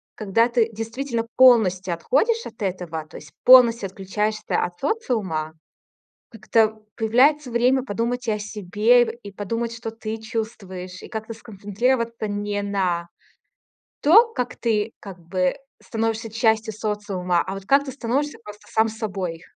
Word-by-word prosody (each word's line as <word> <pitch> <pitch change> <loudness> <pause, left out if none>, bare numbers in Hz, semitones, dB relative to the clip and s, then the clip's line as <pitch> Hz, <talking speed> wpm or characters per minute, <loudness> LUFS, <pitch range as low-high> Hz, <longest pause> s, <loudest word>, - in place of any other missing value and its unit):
когда 220 +2 +2
ты 235 -2 +2
действительно 230 +2 -3
полностью 195 -8 +5
отходишь 440 - +1
от 225 -1 -11
этого, 175 -5 -3
то - - -11
есть 140 - -13
полностью 235 -5 +7
отключаешься 210 +3 -2
от 175 0 -5
социума, 210 - -2 0.8
как-то 220 0 +1
появляется 255 +5 +3
время 250 +2 +2
подумать 245 +1 -2
и - - +2
о 210 - -3
себе, 210 +4 +2 0.2
и 200 - -8
подумать, 230 +4 -3
что 230 -1 -6
ты 225 0 -5
чувствуешь, 195 -5 -6
и - - -8
как-то 220 +1 -5
сконцентрироваться 225 +2 -2
не 205 0 -2
на 185 -4 -1 1.0
том, 450 +10 +6
как 250 0 -3
ты, 220 -1 0
как 195 -3 -10
бы, 180 +2 -1 0.3
становишься 225 0 -2
частью 220 0 +1
социума, 200 -5 -1
а 190 - -5
вот 195 0 -9
как 280 +1 +4
ты 265 - -6
становишься 275 +3 -2
просто 210 0 -12
сам 220 0 +2
собой. 190 -7 -4
220 Hz, 140 wpm, -23 LUFS, 195-235 Hz, 1.0 s, полностью